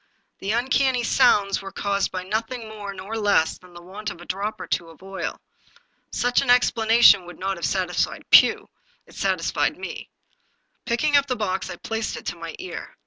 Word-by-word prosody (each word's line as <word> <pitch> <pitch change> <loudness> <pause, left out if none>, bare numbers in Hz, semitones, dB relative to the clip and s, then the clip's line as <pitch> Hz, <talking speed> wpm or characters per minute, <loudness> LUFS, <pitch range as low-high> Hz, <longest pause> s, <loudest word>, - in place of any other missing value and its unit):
The 195 - -5
uncanny 255 +2 +1
sounds 200 -3 +3
were 195 0 -8
caused 200 0 -1
by 185 -1 -4
nothing 225 +4 -3
more 210 -2 -7
nor 195 +3 -7
less 200 -7 +2
than 180 -1 -18
the 175 - -11
want 205 +4 -6
of 170 - -9
a 175 - -11
drop 200 +3 -3
or - - -6
two 170 -2 -2
of 165 +3 -17
oil. 195 0 -5 0.7
Such 245 0 +1
an 275 - -3
explanation 225 -5 +5
would 175 - -10
not 195 0 -3
have 170 - -3
satisfied 180 -3 -1
Pugh, - - +6 0.4
it - - -19
satis - - -1
fied - - 0
me. - - -7 0.8
Picking 290 +6 +1
up 280 0 +2
the 255 - -1
box, 195 -4 -2
I - - -5
placed 225 +4 -4
it - - -10
to - - -3
my 165 -1 -8
ear. 370 - -8
200 Hz, 195 wpm, -23 LUFS, 185-230 Hz, 0.8 s, Pugh